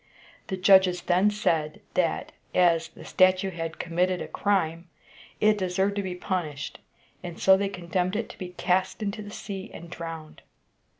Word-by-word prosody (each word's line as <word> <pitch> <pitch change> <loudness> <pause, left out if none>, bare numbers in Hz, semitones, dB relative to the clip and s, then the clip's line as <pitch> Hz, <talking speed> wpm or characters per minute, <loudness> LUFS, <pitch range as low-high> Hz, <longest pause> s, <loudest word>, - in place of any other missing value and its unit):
The 190 - -3
judges 185 -1 +5
then 185 +3 +3
said, 160 -7 0
that, - - 0 0.2
as 170 -2 +4
the - - -14
statue 185 +1 +3
had 165 -2 -5
committed 180 +2 0
a - - -5
crime, 170 -4 0 0.5
it 210 0 +4
deserved 190 +2 0
to - - +1
be 185 -2 -4
punished, 175 -6 -4 0.4
and 175 -1 -7
so 190 - +6
they 200 +1 0
condemned 180 0 -2
it 225 - -1
to - - -11
be 185 - -5
cast 185 +3 0
into 200 +1 -3
the 205 - -8
sea 195 -2 -7
and 170 0 -10
drowned. 165 -3 -7
185 Hz, 165 wpm, -27 LUFS, 170-195 Hz, 0.5 s, so